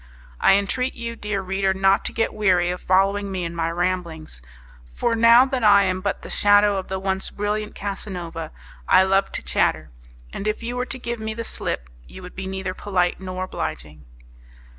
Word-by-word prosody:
I 195 - +5
entreat 250 +6 -1
you, 230 0 -5
dear 210 -3 -3
reader, 190 0 0
not 195 +1 +3
to - - +1
get 225 - -1
weary 180 -4 +2
of 180 - -5
following 195 +2 +2
me 185 -2 -3
in 170 0 -5
my 165 0 -1
ramblings; 170 - -3 0.5
for 235 - 0
now 230 +2 +7
that 260 -3 -2
I 200 -1 +7
am 185 -1 -1
but 200 +1 -3
the - - -8
shadow 205 0 +4
of 190 - -4
the 190 - -3
once 190 0 -1
brilliant 210 +1 -3
Casanova, 180 -5 -5 0.4
I 185 - +7
love 195 +1 +2
to - - -4
chatter; 80 -2 0 0.4
and 200 - -4
if 215 +2 -2
you 240 +1 -4
were 250 0 -2
to 265 - -4
give 235 -2 -5
me 220 0 -4
the 230 - -4
slip, 65 - -3 0.2
you 185 - -11
would 180 - -10
be 190 0 -5
neither 190 -1 -4
polite 185 -3 0
nor 185 -1 -5
obliging. 75 - -6
195 Hz, 195 wpm, -23 LUFS, 180-210 Hz, 0.5 s, now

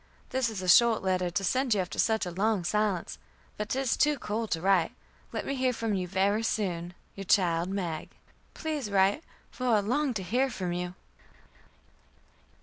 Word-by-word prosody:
This 260 -2 +1
is 200 -4 -5
a - - -4
short 230 +4 +6
letter 185 -1 +1
to 175 +3 -2
send 255 +4 +2
you - - 0
after 180 - -5
such 220 -3 +2
a 180 - -4
long 200 +1 0
silence, 205 -1 -1 0.4
but 210 0 -4
'tis 265 -2 0
too 295 -1 +2
cold 220 -1 -3
to 165 - 0
write. 185 -1 +2 0.4
Let - - -4
me 275 - -2
hear 255 -2 +1
from 225 -2 -2
you 185 -2 -1
very 195 +4 +1
soon. 180 -6 -2 0.2
"Your 195 - -7
child 175 -2 +2
MAG. 175 -5 -3 0.5
"Please 305 -8 -3
write, 200 +8 +2 0.3
for 255 - -4
I 225 -3 +4
long 255 +5 0
to 195 - -2
hear 255 +8 +1
from 185 -7 -3
you." 180 0 -4
205 Hz, 180 wpm, -29 LUFS, 180-235 Hz, 0.5 s, short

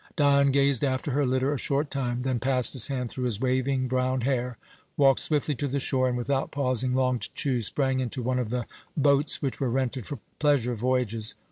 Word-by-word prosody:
Dion 140 -2 +4
gazed 140 -1 +2
after 135 +1 -1
her 140 +1 +1
litter 130 +2 +1
a 140 - -3
short 145 +1 0
time, 125 -3 -2
then 130 -2 -1
passed 125 -1 +2
his 130 -5 +5
hand 125 -4 -3
through 125 - -4
his 115 -5 -2
waving 130 +1 0
brown 130 0 0
hair, 125 -1 -1 0.4
walked 135 -2 +4
swiftly 150 -1 0
to 140 +2 -3
the 140 +1 -2
shore 130 -1 +1
and, 125 -1 -1
without 135 +2 -1
pausing 130 -2 0
long 130 -1 +1
to - - -2
choose, 125 -6 +1
sprang 135 -2 0
into 125 0 -3
one 125 +1 0
of 120 -4 -2
the 120 0 -2 0.3
boats 145 +1 +2
which 135 - -2
were 135 - 0
rented 130 -1 -2
for 145 - -5 0.2
pleasure 140 -5 +2
voyages. 115 -2 -1
130 Hz, 210 wpm, -26 LUFS, 125-140 Hz, 0.4 s, his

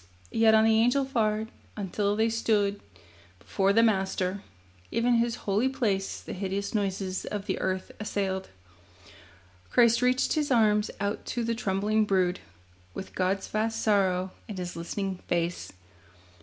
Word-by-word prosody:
Yet 225 -1 +5
on 220 - +5
the 220 0 +4
Angel 245 +4 +3
fared, 220 -4 0 0.3
until 205 +1 -1
they 220 +1 +2
stood 205 -3 +1 0.6
Before 100 - 0
the 225 +3 +5
Master. 190 -2 0 0.5
(Even 240 +1 +2
His 230 0 +1
holy 210 +6 +2
place 210 -8 -1
The - - -7
hideous 195 +2 -3
noises 195 -2 -1
of 205 -1 -4
the 190 - -2
earth 185 0 -2
assailed.) 195 -3 -2 1.2
Christ 235 -1 +4
reached 250 +1 +2
His 300 -2 0
arms 215 -4 +3
out 200 +1 -2
to 240 - -2
the 230 0 0
trembling 210 0 +1
brood, 185 -3 +1 0.6
With 190 - -7
God's 190 +1 0
vast 225 +1 -1
sorrow 190 -3 +2 0.2
in 210 - -6
His 180 -2 -5
listening 185 +3 -4
face. 175 0 -1
205 Hz, 140 wpm, -28 LUFS, 190-225 Hz, 1.2 s, Yet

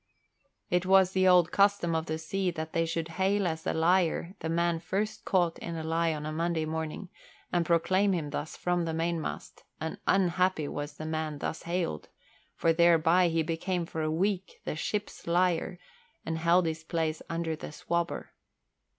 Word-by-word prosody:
It 180 0 +2
was 190 -1 +6
the 185 0 +3
old 180 -2 +5
custom 200 -4 +3
of 160 0 -1
the 160 - -2
sea 185 +4 -1
that 160 -2 -5
they 165 0 +1
should 165 0 -2
hail 200 +1 +2
as 160 -2 -2
a - - +1
liar 170 +1 +2
the 160 - -4
man 170 0 +1
first 210 +5 -3
caught 175 -3 +1
in 170 - -5
a 160 - -4
lie 165 +1 +1
on 150 -1 -4
a 155 - -3
Monday 165 0 -1
morning 160 +4 -4 0.4
and 175 -1 +1
proclaim 185 +4 +3
him 160 -6 -2
thus 150 +1 -4
from 175 -1 0
the 165 -1 -2
mainmast, 165 -1 -3 0.2
and 160 0 -4
unhappy 185 -4 +2
was 145 +1 -5
the 155 - -6
man 155 -1 -2
thus 155 - -4
hailed, 170 - -2 0.5
for 165 - +2
thereby 170 +1 +5
he 165 -1 +1
became 170 +2 -2
for 160 -1 -4
a 155 - 0
week 190 +4 -1
the - - -2
"ship's 205 +5 -4
liar" 180 0 +1 0.5
and 160 0 -2
held 170 +2 +4
his 160 0 -3
place 160 -1 -2
under 165 -1 -2
the 155 - -8
swabber. 170 +2 -2
170 Hz, 180 wpm, -29 LUFS, 160-180 Hz, 0.5 s, was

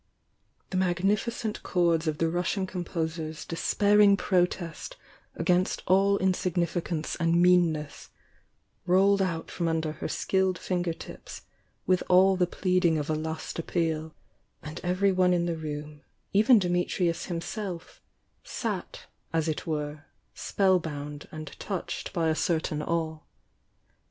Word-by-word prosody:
The 185 - -1
magnm 185 +2 +2 0.2
cent 220 -2 -4
chords 170 -2 +1
of 155 -1 0
the 165 - +1
Russian 180 +3 -1
composer's 160 -3 -4
despairing 205 +4 +4
protest 180 -3 -1 0.4
against 180 +2 +1
all 195 +2 +4
insignificance 175 -3 -1
and 170 0 +2
meanness, 175 -4 +2 0.8
rolled 195 +2 +4
out 170 -4 -2
from 170 - -2
under 160 -1 0
her 155 - -5
skilled 190 -1 0
finger 175 -1 -1
tips - - -10 0.4
with 185 0 +2
all 190 +1 +6
the 180 -1 +2
pleading 180 -3 +1
of 150 0 -2
a - - +2
last 160 +2 -4
appeal, 160 -2 -2 0.2
— - - -42
and 150 +1 -7
everyone 185 0 +3
in 175 -1 +1
the 170 -1 -1
room, 150 -1 -6 0.3
even 215 +5 +6
Dimitrius 175 -1 0
himself, 175 +1 -5 0.4
sat, - - -4 0.3
as 165 -1 0
it 155 +1 -3
were, 150 -1 -3 0.3
spell 190 -2 +2
bound 145 -2 -6
and 155 -2 -8
touched 190 -4 -4
by 165 -2 0
a - - +3
certain 155 -2 -1
awe. 160 -1 -2
175 Hz, 130 wpm, -28 LUFS, 160-185 Hz, 0.8 s, all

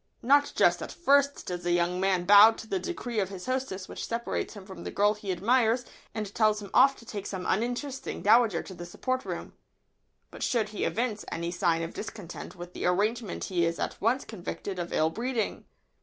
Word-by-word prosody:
Not 285 +4 +4
just - - +4
at - - -5
first 280 -3 +2
does 180 -1 -4
a 175 - 0
young 175 +1 +1
man 185 -2 +1
bow 205 +3 +9
to 225 - -9
the 195 -3 -1
decree 245 - -3
of 190 -2 0
his 190 -2 -8
hostess 255 -8 -3
which - - -6
separates 235 -1 -3
him 200 -2 -10
from 190 -3 -9
the - - -4
girl 205 +1 +3
he 210 -2 -5
admires 230 +5 +2 0.3
and 210 -2 -4
tells 215 -1 +3
him 200 -2 -9
off 275 +2 +6
to 230 - -15
take 205 -3 -6
some 185 -2 -5
uninteresting 245 +6 -2
dowager 215 -4 +4
to 190 - -9
the 175 -1 -8
supper 255 +8 -2
room. - - -6 0.8
But - - -11
should 225 -4 +1
he 210 - -2
evince 225 -2 -1
any 170 +1 -3
sign 170 -2 +1
of 165 - -5
discontent 210 -5 -7
with 175 0 -9
the - - -2
arrangement 210 +3 0
he 175 -3 0
is 165 0 0
at - - -4
once 240 +5 +1
convicted 195 -1 -6
of 175 0 -4
ill 160 +1 +2
breeding. 235 +2 -2
210 Hz, 205 wpm, -28 LUFS, 180-235 Hz, 0.8 s, bow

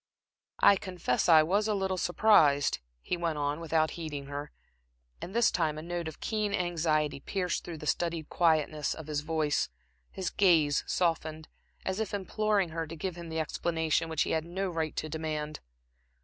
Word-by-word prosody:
"I 200 - +7
confess 180 -8 -1
I 160 -2 +8
was 200 +6 +1
a 215 - +1
little 190 -1 0
surprised," 160 -7 +4 0.2
he - - -1
went 170 -3 -2
on, 145 +1 -1
without 160 -1 +1
heeding 150 -4 -5
her, 145 +1 -6 0.7
and 190 - -7
this 235 -1 +4
time 155 -4 0
a 155 - -6
note 170 -1 -3
of 160 - -8
keen 210 -2 -1
anxiety 155 -5 0
pierced 180 +4 -2
through 170 -2 -7
the 150 - -8
studied 165 +1 -1
quietness 155 -3 +1
of 160 - -8
his 150 -1 -2
voice, 155 -1 0 0.4
his 190 - -4
gaze 160 -7 +4
softened, 160 -3 -1 0.4
as 190 +2 -1
if 215 -2 -2
imploring 205 -1 0
her 165 0 -3
to 165 - -7
give 175 +2 -4
him 170 -1 -8
the 160 0 -2
explanation 160 +1 0
which 160 -1 +1
he - - -3
had 160 - +1
no 185 +3 -3
right 160 -2 -2
to 155 - -2
demand. 155 -1 -4
165 Hz, 175 wpm, -30 LUFS, 155-180 Hz, 0.7 s, I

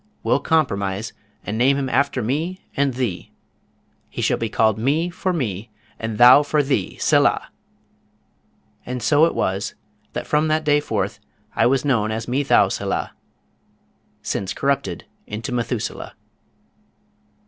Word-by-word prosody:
"We'll - - +2
compromise, 100 - 0 0.3
and 110 +2 -3
name 135 +3 +4
him 135 -1 -1
after 130 0 +1
me 160 - -3
and 140 -2 +1
thee. 125 -8 -3 0.8
He - - -4
shall - - +1
be 115 - -2
called 110 -1 +2
Me 155 +9 +1
for 185 +1 -2
me, 115 - -3 0.3
and 115 -1 -4
Thou 125 +4 +8
for 150 0 +1
thee, 135 -9 -1
Selah!" - - +2 1.3
And 125 -2 -5
so 150 +4 +5
it 165 - -1
was 95 +1 -1 0.4
that - - -4
from 150 +1 +1
that 155 0 +1
day 145 0 +4
forth 145 - -3 0.4
I - - +4
was 135 +2 +1
known 115 -6 +1
as 110 +1 -3
Methouselah, 135 +3 +1 1.1
since 100 0 -3
corrupted 140 -11 -1 0.2
into 110 +5 -5
Methuselah. 120 -1 -3
130 Hz, 135 wpm, -21 LUFS, 110-145 Hz, 1.3 s, Thou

